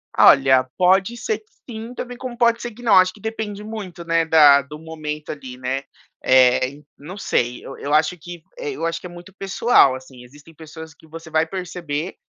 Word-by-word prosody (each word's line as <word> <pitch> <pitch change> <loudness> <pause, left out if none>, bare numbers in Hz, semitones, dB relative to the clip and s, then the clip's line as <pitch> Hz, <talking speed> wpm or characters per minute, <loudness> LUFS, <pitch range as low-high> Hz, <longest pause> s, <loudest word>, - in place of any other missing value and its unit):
Olha, 130 -1 +6
pode 190 +5 +3
ser 440 - -2
que 430 - -32 0.2
sim, 230 +1 -7
também 245 -1 -7
como 245 -2 -7
pode 235 -1 +2
ser 240 - -5
que 235 +3 -15
não. 230 - +4
Acho 185 0 +4
que 210 - -17
depende 220 -2 -5
muito 205 -6 -8
né 165 0 +1
da 150 -3 +6
do 150 +3 -11
momento 155 -2 -6
ali, 130 -4 -9
né? 130 +2 -3 0.4
Eh, 130 0 +4
en 145 +2 -16
não 175 +8 -10
sei, 125 -9 -1
eu 135 - -9
eu 145 +1 -4
acho 155 +4 +2
que 175 0 -11
eu 440 - -4
acho 165 0 -2
que - - -14
é - - -13
muito 175 +3 -13
pessoal, 195 - +3
assim, 130 -1 -12
existem 145 +6 -17
pessoas 160 0 -11
que 160 - -21
você 165 +1 -11
vai 160 +1 +1
perceber 175 -3 -5
165 Hz, 205 wpm, -21 LUFS, 145-200 Hz, 0.4 s, Olha